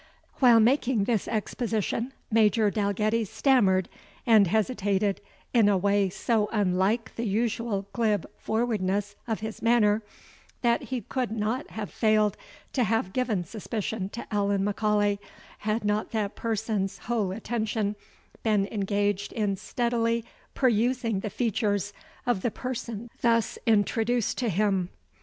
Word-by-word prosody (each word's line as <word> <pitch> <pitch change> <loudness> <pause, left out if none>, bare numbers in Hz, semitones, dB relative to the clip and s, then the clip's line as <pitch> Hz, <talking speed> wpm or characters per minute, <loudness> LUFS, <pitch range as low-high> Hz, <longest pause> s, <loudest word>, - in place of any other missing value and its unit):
While 240 -4 +7
making 245 -1 +3
this 220 -1 0
exposition, 225 +2 -2 0.2
Major 215 -1 +4
Dalgetty 210 +2 +1
stammered 200 -5 +3 0.4
and 220 -4 +6
hesitated 205 -1 0 0.3
in 225 -4 +5
a 200 - +3
way 200 +1 +2
so 210 +3 0
unlike 205 +2 +1
the 230 0 -2
usual 220 -1 -1
glib 215 -5 +1
forwardness 205 -3 -1
of 220 -2 -2
his 220 0 -6
manner, 225 -2 +3 0.6
that 235 -1 +2
he 255 -2 -3
could 250 +4 -2
not 225 +5 -2
have 215 -1 -6
failed 215 -2 +2 0.4
to 255 - +2
have 225 -4 0
given 230 -8 0
suspicion 210 +1 -4
to 235 - -7
Allan 200 -1 +1
M'Aulay, 205 -1 +1 0.4
had 215 +1 -1
not 210 +1 0
that 210 -2 -1
person's 215 -3 -2
whole 210 -1 -1
attention 215 -1 -2 0.5
been 210 -3 +2
engaged 205 -1 0
in 205 -4 0
steadily 230 +1 -1 0.3
perusing 240 -3 +1
the 210 - -4
features 205 -2 -1 0.3
of 240 -6 +1
the 240 - +1
person 235 -2 -5
thus 230 -1 +2
introduced 225 +2 +2
to 245 -3 0
him. 195 -2 +1
215 Hz, 130 wpm, -27 LUFS, 205-230 Hz, 0.6 s, While